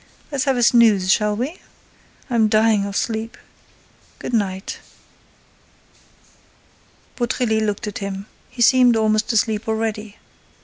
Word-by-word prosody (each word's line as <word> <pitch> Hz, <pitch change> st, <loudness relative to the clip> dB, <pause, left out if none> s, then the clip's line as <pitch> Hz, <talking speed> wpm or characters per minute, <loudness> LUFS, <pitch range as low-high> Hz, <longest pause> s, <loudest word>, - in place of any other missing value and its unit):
—Let's 275 Hz, -3 st, -1 dB
have 270 Hz, -2 st, +1 dB
a 245 Hz, -, +1 dB
snooze, 220 Hz, -6 st, +4 dB
shall 210 Hz, -1 st, 0 dB
we?—I'm 240 Hz, -, -4 dB
dying 215 Hz, -1 st, +3 dB
of 200 Hz, -, -7 dB
sleep.—Good 225 Hz, +2 st, -8 dB
night." 195 Hz, -3 st, -2 dB, 2.4 s
Beautrelet 235 Hz, -2 st, 0 dB
looked 210 Hz, -1 st, -2 dB
at 210 Hz, -, -5 dB
him. 195 Hz, 0 st, -5 dB, 0.2 s
He 245 Hz, -1 st, -1 dB
seemed 245 Hz, -1 st, +5 dB
almost 215 Hz, 0 st, +1 dB
asleep 220 Hz, 0 st, 0 dB
already. 220 Hz, -1 st, -3 dB
220 Hz, 105 wpm, -20 LUFS, 210-235 Hz, 2.4 s, seemed